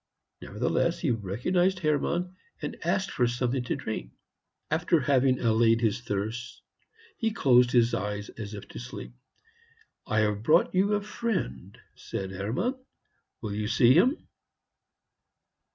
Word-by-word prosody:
Nevertheless -, -, 0 dB
he -, -, 0 dB
recognized 125 Hz, -, 0 dB
Hermann, 175 Hz, +3 st, 0 dB, 0.2 s
and -, -, -5 dB
asked 190 Hz, -, 0 dB
for 125 Hz, -, +2 dB
something 125 Hz, +2 st, -1 dB
to -, -, -1 dB
drink. 65 Hz, -, -5 dB, 0.6 s
After 165 Hz, +1 st, +2 dB
having 130 Hz, -1 st, +3 dB
allayed 115 Hz, 0 st, +3 dB
his 115 Hz, +1 st, +1 dB
thirst, 115 Hz, +3 st, -4 dB, 0.5 s
he 225 Hz, -, 0 dB
closed 125 Hz, -, +4 dB
his 120 Hz, -1 st, +3 dB
eyes, 105 Hz, +1 st, -3 dB
as 105 Hz, -1 st, -7 dB
if 100 Hz, -, -9 dB
to -, -, -8 dB
sleep. 120 Hz, 0 st, -8 dB, 0.9 s
"I 110 Hz, 0 st, +2 dB
have 105 Hz, -1 st, 0 dB
brought 155 Hz, +9 st, +3 dB
you 195 Hz, +3 st, +2 dB
a 205 Hz, -, -1 dB
friend," 205 Hz, -, -3 dB, 0.2 s
said 95 Hz, -1 st, -6 dB
Hermann; 125 Hz, -, -2 dB, 0.6 s
"will 105 Hz, -2 st, -3 dB
you 105 Hz, 0 st, -2 dB
see 120 Hz, +2 st, +5 dB
him?" 260 Hz, -, +4 dB
120 Hz, 135 wpm, -28 LUFS, 110-170 Hz, 0.9 s, see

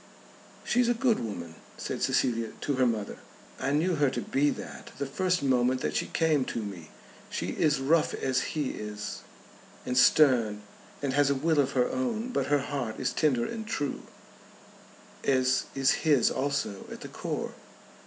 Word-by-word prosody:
"She's 240 Hz, 0 st, +2 dB
a 240 Hz, -, +3 dB
good 235 Hz, -2 st, +2 dB
woman," 90 Hz, -8 st, -5 dB, 0.2 s
said -, -, -4 dB
Cecilia 115 Hz, -2 st, +1 dB
to 145 Hz, -, 0 dB
her 130 Hz, -1 st, +3 dB
mother. 110 Hz, -3 st, -2 dB, 0.4 s
"I -, -, -1 dB
knew 160 Hz, +6 st, +2 dB
her 145 Hz, -2 st, +3 dB
to 130 Hz, -, -3 dB
be 145 Hz, +2 st, +2 dB
that -, -, -7 dB
the 140 Hz, -, -2 dB
first 180 Hz, +4 st, 0 dB
moment 130 Hz, -1 st, +2 dB
that -, -, -2 dB
she -, -, 0 dB
came 155 Hz, -4 st, +2 dB
to 115 Hz, -, -3 dB
me. 90 Hz, -6 st, -8 dB, 0.4 s
She 85 Hz, -, -3 dB
is 150 Hz, -, +2 dB
rough 150 Hz, +4 st, +2 dB
as 130 Hz, -1 st, 0 dB, 0.2 s
he 145 Hz, -3 st, 0 dB
is, 105 Hz, -1 st, -6 dB, 0.6 s
and 125 Hz, -, -2 dB
stern, 120 Hz, -6 st, +4 dB, 0.4 s
and 135 Hz, -2 st, 0 dB
has 145 Hz, 0 st, +4 dB
a 140 Hz, -, +2 dB
will 155 Hz, +2 st, +1 dB
of 135 Hz, -1 st, +2 dB
her 125 Hz, -2 st, +3 dB
own. 245 Hz, -2 st, -2 dB
But 250 Hz, -, -1 dB
her 145 Hz, -1 st, +3 dB
heart 135 Hz, -5 st, -4 dB
is -, -, -1 dB
tender 130 Hz, -7 st, +2 dB
and 220 Hz, -2 st, -5 dB
true; 145 Hz, -8 st, -2 dB, 1.2 s
as 130 Hz, -1 st, +2 dB
is 135 Hz, +1 st, +4 dB
his 145 Hz, -6 st, +4 dB
also 140 Hz, -7 st, -2 dB
at -, -, -8 dB
the -, -, -6 dB
core." -, -, -4 dB
135 Hz, 175 wpm, -28 LUFS, 120-155 Hz, 1.2 s, stern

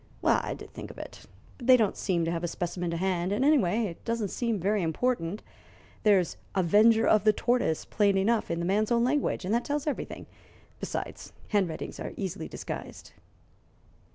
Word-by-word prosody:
"I -, -, +2 dB
did -, -, -12 dB
think -, -, -8 dB
of -, -, -12 dB
it, -, -, -10 dB, 0.3 s
but 245 Hz, -, -7 dB
they 255 Hz, -1 st, +8 dB
don't 215 Hz, -5 st, +1 dB
seem 175 Hz, -4 st, 0 dB
to 165 Hz, -, -1 dB
have 170 Hz, 0 st, -3 dB
a -, -, 0 dB
specimen 175 Hz, +1 st, -3 dB
to 170 Hz, -, -2 dB
hand, 180 Hz, 0 st, 0 dB
and, 225 Hz, +7 st, +1 dB
anyway, 235 Hz, -, +3 dB
it 170 Hz, -5 st, -7 dB
doesn't 230 Hz, -3 st, -1 dB
seem 230 Hz, -1 st, -1 dB
very 200 Hz, +3 st, +1 dB
important. 180 Hz, +2 st, -1 dB, 0.6 s
There's 195 Hz, -5 st, +3 dB, 0.2 s
'avenger 215 Hz, +5 st, +5 dB
of 215 Hz, -2 st, +4 dB
the 215 Hz, -, +6 dB
tortoise' 240 Hz, -9 st, 0 dB
plain 200 Hz, -2 st, +2 dB
enough, 215 Hz, +3 st, +1 dB
in 170 Hz, -, -1 dB
the 170 Hz, -, -2 dB
man's 210 Hz, +5 st, +1 dB
own 235 Hz, 0 st, +3 dB
language, 260 Hz, -6 st, 0 dB
and 195 Hz, -, 0 dB
that 235 Hz, +1 st, +2 dB
tells 290 Hz, 0 st, -2 dB
everything. 295 Hz, -, -4 dB, 0.5 s
Besides, -, -, -5 dB, 0.2 s
handwritings 190 Hz, -6 st, -1 dB
are -, -, -5 dB
easily 190 Hz, -4 st, -4 dB
disguised." -, -, -7 dB
205 Hz, 180 wpm, -28 LUFS, 175-235 Hz, 0.6 s, they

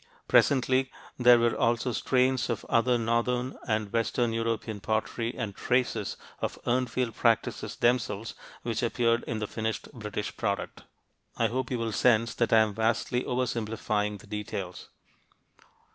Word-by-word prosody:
Presently 130 Hz, 0 st, +3 dB, 0.3 s
there 125 Hz, -1 st, +8 dB
were 115 Hz, 0 st, +2 dB
also 120 Hz, +2 st, +1 dB
strains 130 Hz, +1 st, +1 dB
of 115 Hz, -, -2 dB
other 120 Hz, +1 st, +3 dB
northern 120 Hz, +2 st, 0 dB
and 110 Hz, -3 st, -1 dB
western 115 Hz, 0 st, +1 dB
European 115 Hz, -2 st, -2 dB
pottery 110 Hz, +3 st, -1 dB
and 110 Hz, -5 st, -3 dB
traces 120 Hz, -4 st, 0 dB, 0.2 s
of -, -, -3 dB
Urnfield 125 Hz, -1 st, 0 dB
practices -, -, 0 dB
themselves 115 Hz, -3 st, 0 dB, 0.3 s
which 115 Hz, -2 st, -2 dB
appeared 115 Hz, 0 st, +1 dB
in 115 Hz, -, -2 dB
the 110 Hz, -, -2 dB
finished 110 Hz, +1 st, -4 dB
British 105 Hz, -3 st, -5 dB
product. 100 Hz, -3 st, -3 dB, 0.5 s
I -, -, +2 dB
hope 130 Hz, +1 st, -2 dB
you 125 Hz, -, -1 dB
will 115 Hz, -1 st, -2 dB
sense 115 Hz, 0 st, +3 dB
that 120 Hz, -, 0 dB
I 110 Hz, -, +7 dB
am 110 Hz, -1 st, +1 dB
vastly 115 Hz, +3 st, 0 dB
over 125 Hz, +1 st, 0 dB
simplifying 105 Hz, -3 st, -2 dB
the -, -, -15 dB
details. 100 Hz, -3 st, -5 dB
115 Hz, 145 wpm, -28 LUFS, 110-125 Hz, 0.5 s, there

